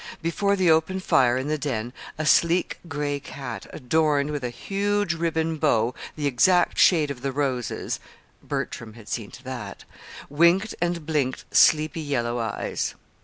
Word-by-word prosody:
Before 200 Hz, +4 st, +1 dB
the 185 Hz, -4 st, +3 dB
open 160 Hz, +4 st, +2 dB
fire 130 Hz, -8 st, +3 dB
in 130 Hz, +2 st, -3 dB
the 155 Hz, 0 st, -1 dB
den 120 Hz, -4 st, -3 dB, 0.2 s
a 155 Hz, -, -2 dB
sleek 170 Hz, +3 st, +3 dB
gray 145 Hz, -2 st, -2 dB
cat 135 Hz, -4 st, -7 dB
adorned 150 Hz, +1 st, +1 dB
with 145 Hz, -3 st, -4 dB
a 125 Hz, -, -1 dB
huge 200 Hz, -, -1 dB
ribbon 165 Hz, -1 st, -1 dB
bow 120 Hz, -6 st, +2 dB, 0.2 s
the 150 Hz, -, -3 dB
exact 175 Hz, +7 st, +3 dB
shade 155 Hz, -5 st, +5 dB
of 125 Hz, -3 st, -7 dB
the 135 Hz, 0 st, -2 dB
roses 130 Hz, -4 st, -2 dB, 0.4 s
(Bertram 115 Hz, -2 st, -4 dB
had 115 Hz, -3 st, -14 dB
seen 105 Hz, -1 st, -4 dB
to 130 Hz, -, -13 dB
that!) 120 Hz, -7 st, -7 dB, 0.4 s
winked 170 Hz, +8 st, +3 dB
and 175 Hz, -2 st, -1 dB
blinked 145 Hz, -5 st, -1 dB
sleepy 155 Hz, +1 st, +4 dB
yellow 120 Hz, -5 st, -1 dB
eyes. 110 Hz, -3 st, -3 dB
145 Hz, 155 wpm, -25 LUFS, 125-165 Hz, 0.4 s, shade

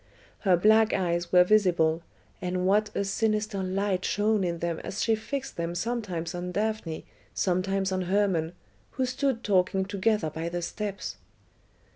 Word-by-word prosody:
Her 185 Hz, -3 st, +3 dB
black 220 Hz, +4 st, +5 dB
eyes 175 Hz, -1 st, -1 dB
were 180 Hz, -1 st, +7 dB
visible, 175 Hz, -5 st, +3 dB, 0.4 s
and 180 Hz, 0 st, -1 dB
what 210 Hz, +2 st, +3 dB
a -, -, +1 dB
sinister 215 Hz, 0 st, 0 dB
light 190 Hz, 0 st, -1 dB
shone 210 Hz, 0 st, +1 dB
in 170 Hz, -1 st, -1 dB
them 170 Hz, -1 st, -2 dB
as 195 Hz, -, -3 dB
she 225 Hz, -, +3 dB
fixed 270 Hz, +5 st, -4 dB
them 170 Hz, 0 st, -2 dB
sometimes 195 Hz, -5 st, -3 dB
on 180 Hz, 0 st, -4 dB
Daphne, 210 Hz, -5 st, -2 dB, 0.3 s
sometimes 190 Hz, +1 st, 0 dB
on 185 Hz, 0 st, 0 dB
Hermon, 185 Hz, -4 st, +1 dB, 0.4 s
who 260 Hz, -, 0 dB
stood 255 Hz, -1 st, -1 dB
talking 190 Hz, -1 st, +2 dB
together 200 Hz, -4 st, 0 dB
by 165 Hz, +2 st, -4 dB
the 175 Hz, 0 st, -3 dB
steps! 195 Hz, -, -4 dB
190 Hz, 150 wpm, -27 LUFS, 175-215 Hz, 0.4 s, were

